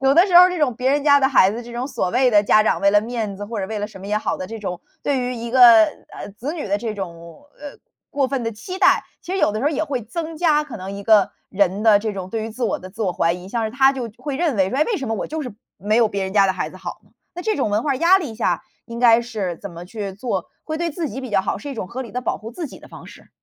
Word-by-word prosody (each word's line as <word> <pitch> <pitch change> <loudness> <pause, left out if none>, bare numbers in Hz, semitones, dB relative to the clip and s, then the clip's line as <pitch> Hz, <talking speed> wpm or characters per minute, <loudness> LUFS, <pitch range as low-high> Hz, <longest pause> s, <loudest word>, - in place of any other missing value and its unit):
有 270 +1 +3
的 345 +5 +6
时 360 -3 +4
候 355 - +11
儿 365 - +3
这 360 - -3
种 275 -6 +1
别 255 +2 0
人 290 +1 +1
家 285 -1 +6
的 265 - +3
孩 200 -8 +4
子， 235 +3 -5
这 235 0 -11
种 245 +2 -3
所 185 -9 -2
谓 255 +1 +3
的 210 -4 +5
家 215 +1 +4
长 - - +1
为 200 - +4
了 205 +1 +5
面 220 -3 -4
子 205 - -6
或 215 -1 -4
者 190 - -3
为 220 -1 -3
了 205 - -2
什 210 -3 -13
么 195 - -8
也 210 +1 +1
好 - - -2
的 185 +1 -6
这 225 - -6
种， 180 -4 -5 0.2
对 275 -2 0
于 250 0 -2
一 235 0 -6
个， 260 - +3 0.2
呃， 200 - -9
子 275 +7 -4
女 320 - -5
的 200 0 0
这 225 0 -3
种， 170 - -9 0.2
呃， 290 -1 -9 0.3
过 280 -1 +1
分 260 -1 -2
的 230 - -2
期 365 - -7
待。 - - +4 0.2
其 360 - -7
实 385 - -1
有 210 - +2
的 215 - -3
时 - - -2
候 - - +4
儿 - - -4
也 315 - -1
会 275 -4 -3
增 320 +8 -6
加 305 -3 +3
可 270 -7 -9
能 190 +1 -6
一 200 0 -7
个 210 -1 +4 0.2
人 195 +1 +1
的 215 -2 +6
这 215 0 -3
种 190 -1 -6
对 220 0 -3
于 225 - -5
自 240 +3 -4
我 225 - -1
的 185 - -9
自 210 +4 -6
我 185 -4 0
怀 165 -1 +1
疑。 180 0 -9
像 230 +2 -2
是 - - -5
他 270 +3 +4
就 245 -4 -5
会 285 -3 -5
认 320 -7 0
为 190 -1 +2
说： - - -2
“诶， 305 - +5
为 450 - -1
什 275 - -5
么 225 - -1
我 200 - -3
就 315 0 -4
是 250 -6 -7 0.2
没 210 +3 0
有 230 -2 +4
别 200 -1 -3
人 190 - -4
家 200 -1 +5
的 190 - +1
孩 185 - -4
子 - - -13
好？” - - -7 0.3
那 355 - -6
这 435 +2 0
种 260 - 0
文 210 +2 +1
化 285 -2 0
压 340 +6 +5
力 290 -12 -6
下， 230 - -1 0.2
应 235 0 -7
该 235 -1 +6
是 210 -8 -4
怎 200 - -8
么 170 +1 -9
去 200 0 -6
做 235 +5 -3 0.2
会 315 0 -4
对 340 0 -1
自 320 0 -3
己 265 - -6
比 260 - -6
较 195 -2 +2
好， - - -2
是 290 - -8
一 275 - -5
种 200 - -5
合 240 +6 -6
理 240 -4 -7
地 250 0 -4
保 - - -2
护 220 - -9
自 315 +7 -5
己 - - -12
的 - - -15
方 - - -12
式？ - - -15
230 Hz, 355 characters per minute, -21 LUFS, 205-275 Hz, 0.3 s, 候